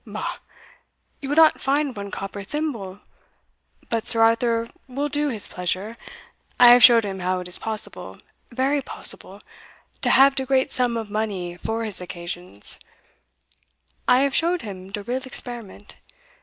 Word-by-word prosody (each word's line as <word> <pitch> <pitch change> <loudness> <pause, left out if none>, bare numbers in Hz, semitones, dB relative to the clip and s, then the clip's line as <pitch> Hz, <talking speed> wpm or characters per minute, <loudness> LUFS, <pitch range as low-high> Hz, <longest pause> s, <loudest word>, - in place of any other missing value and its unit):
"Bah! - - -5 0.8
you 275 - -5
will 290 - 0
not 320 -1 +5
find 280 -1 0
one 200 -1 -6
copper 195 +1 -6
thimble 215 -7 -4 0.9
But 230 -1 -2
Sir 225 - +6
Arthur 230 0 +2 0.2
will 280 +3 -3
do 295 0 0
his 220 -6 0
pleasure. 185 +5 -3 0.6
I 245 - +10
have 245 +1 +8
showed 230 -3 +8
him 195 -1 -5
how 185 0 -1
it 180 - -7
is 180 - +1
possible 220 -1 -5 0.3
very 270 +4 +1
possible - - -4 0.6
to - - +2
have 275 +1 +6
de 265 - -2
great 265 0 +1
sum 245 -2 0
of 220 -2 -5
money 200 -5 -3
for 225 +5 -3
his 210 -5 0
occasions 175 - -6 1.3
I 250 - +5
have 280 0 +1
showed 345 +2 +1
him 190 -3 -8
de 205 0 -5
real 250 +5 -2
experiment. 240 -5 -6
230 Hz, 155 wpm, -23 LUFS, 195-265 Hz, 1.3 s, I